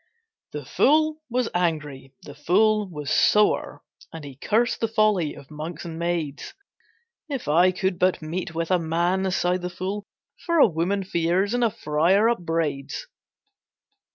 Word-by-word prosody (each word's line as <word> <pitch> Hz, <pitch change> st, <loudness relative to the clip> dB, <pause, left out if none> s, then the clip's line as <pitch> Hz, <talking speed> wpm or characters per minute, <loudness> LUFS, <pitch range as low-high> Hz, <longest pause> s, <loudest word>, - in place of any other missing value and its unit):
The -, -, -6 dB
fool 310 Hz, +1 st, +2 dB
was 245 Hz, 0 st, 0 dB
angry, 150 Hz, -6 st, -2 dB
the 145 Hz, -, -10 dB
fool 205 Hz, +7 st, +2 dB
was 150 Hz, -4 st, -5 dB
sore, 210 Hz, 0 st, +2 dB, 0.3 s
And 165 Hz, -2 st, -9 dB
he 140 Hz, -2 st, -9 dB
cursed 225 Hz, -, 0 dB
the 225 Hz, -, +2 dB
folly 215 Hz, -8 st, +1 dB
of 140 Hz, -, -14 dB
monks 155 Hz, +4 st, -7 dB
and 165 Hz, -1 st, -7 dB
maids. 170 Hz, -, -3 dB, 0.7 s
"If 270 Hz, -, -4 dB
I 175 Hz, +5 st, +4 dB
could 185 Hz, 0 st, -2 dB
but 185 Hz, 0 st, +2 dB
meet 165 Hz, +1 st, -5 dB
with 165 Hz, +2 st, -2 dB
a 180 Hz, -, +3 dB
man," 175 Hz, +4 st, 0 dB
sighed 180 Hz, 0 st, 0 dB
the 180 Hz, -, -3 dB
fool, 190 Hz, +3 st, -5 dB, 0.4 s
"For 335 Hz, -1 st, 0 dB
a 295 Hz, -, +8 dB
woman 190 Hz, +2 st, -1 dB
fears, 180 Hz, +3 st, 0 dB
and 245 Hz, 0 st, +1 dB
a 230 Hz, -, +4 dB
friar 175 Hz, +5 st, +2 dB
upbraids." 165 Hz, -, -2 dB
180 Hz, 155 wpm, -24 LUFS, 160-205 Hz, 0.7 s, a